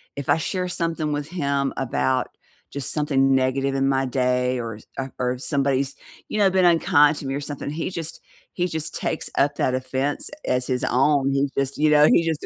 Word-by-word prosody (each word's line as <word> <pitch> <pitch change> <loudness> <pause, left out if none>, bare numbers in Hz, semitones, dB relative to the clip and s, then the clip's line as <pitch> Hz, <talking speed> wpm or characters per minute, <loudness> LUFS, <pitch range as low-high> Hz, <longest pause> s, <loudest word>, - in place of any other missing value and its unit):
if 140 -2 -6
I - - +5
share 180 +2 -2
something 165 -3 -2
with 145 0 -2
him 140 -5 -1
about 130 0 0 0.4
just 140 -2 -4
something 135 -3 +2
negative 135 +1 +1
in 135 0 +2
my 135 0 +1
day 125 0 0
or 115 -2 -5 0.2
ar 135 0 -4
or 125 0 0
somebody's, 140 -1 0 0.3
you - - -3
know, 200 -2 +5
been 185 -1 +3
unkind 150 -3 +5
to - - -7
me 135 - -2
or 140 - -3
something, 145 0 -5
he 165 +3 -3
just 165 -4 -6 0.3
he 180 0 0
just 160 -1 -4
takes - - -3
up 145 +1 +2
that 130 - 0
offense 130 +2 -2 0.2
as 125 0 0
his 125 -1 -1
own. 135 +1 +2
He 140 0 +1
just, 135 0 -1
you 155 +1 +3
know, 150 0 +6
he 165 - +4
just 160 -2 -2
140 Hz, 200 wpm, -23 LUFS, 130-150 Hz, 0.4 s, know